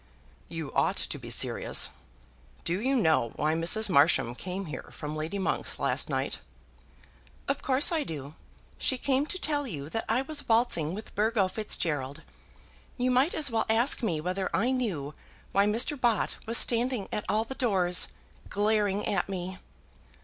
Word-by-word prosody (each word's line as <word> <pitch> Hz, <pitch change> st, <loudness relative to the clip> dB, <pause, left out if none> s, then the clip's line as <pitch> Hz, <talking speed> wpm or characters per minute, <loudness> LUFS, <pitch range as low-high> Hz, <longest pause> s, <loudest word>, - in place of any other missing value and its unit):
"You 160 Hz, -4 st, -6 dB
ought -, -, +2 dB
to -, -, -3 dB
be -, -, -9 dB
serious. -, -, +2 dB, 0.7 s
Do 175 Hz, +4 st, -1 dB
you 265 Hz, +3 st, +1 dB
know 160 Hz, -, +2 dB
why 155 Hz, +1 st, +1 dB
Mrs. 170 Hz, +7 st, +2 dB
Marsham 140 Hz, -, +3 dB
came 185 Hz, +8 st, -5 dB
here 150 Hz, -, -7 dB
from 150 Hz, 0 st, -6 dB
Lady 160 Hz, +6 st, -3 dB
Monk's 190 Hz, -, -1 dB
last -, -, 0 dB
night?" -, -, -1 dB, 1.1 s
"Of 280 Hz, 0 st, -1 dB
course 270 Hz, +4 st, +3 dB
I 320 Hz, -3 st, +1 dB
do. 145 Hz, -, -6 dB, 0.5 s
She 260 Hz, -, +1 dB
came 275 Hz, +3 st, +1 dB
to 370 Hz, -, +2 dB
tell 290 Hz, -5 st, 0 dB
you 145 Hz, -, -6 dB
that 225 Hz, -, -3 dB
I 240 Hz, +4 st, +2 dB
was 290 Hz, -2 st, -1 dB
waltzing 225 Hz, -9 st, +3 dB
with 215 Hz, -, -9 dB
Burgo 215 Hz, -2 st, +2 dB
Fitzgerald. 165 Hz, -8 st, -2 dB, 0.7 s
You 250 Hz, 0 st, +1 dB
might 260 Hz, +7 st, +3 dB
as 295 Hz, -5 st, +1 dB
well 225 Hz, -1 st, 0 dB
ask 235 Hz, +6 st, +4 dB
me 175 Hz, -10 st, 0 dB
whether 185 Hz, +4 st, -2 dB
I 235 Hz, +6 st, +2 dB
knew 185 Hz, -, -2 dB, 0.4 s
why 200 Hz, +1 st, +3 dB
Mr. 240 Hz, +6 st, +1 dB
Bott 235 Hz, -3 st, +1 dB
was 230 Hz, +1 st, +3 dB
standing 240 Hz, -2 st, +2 dB
at 210 Hz, -, -2 dB
all 215 Hz, +1 st, +2 dB
the 230 Hz, -, -6 dB
doors, 190 Hz, -9 st, +2 dB, 0.4 s
glaring 205 Hz, -1 st, +1 dB
at 195 Hz, -1 st, -1 dB
me." 185 Hz, 0 st, -5 dB
210 Hz, 165 wpm, -28 LUFS, 165-250 Hz, 1.1 s, ask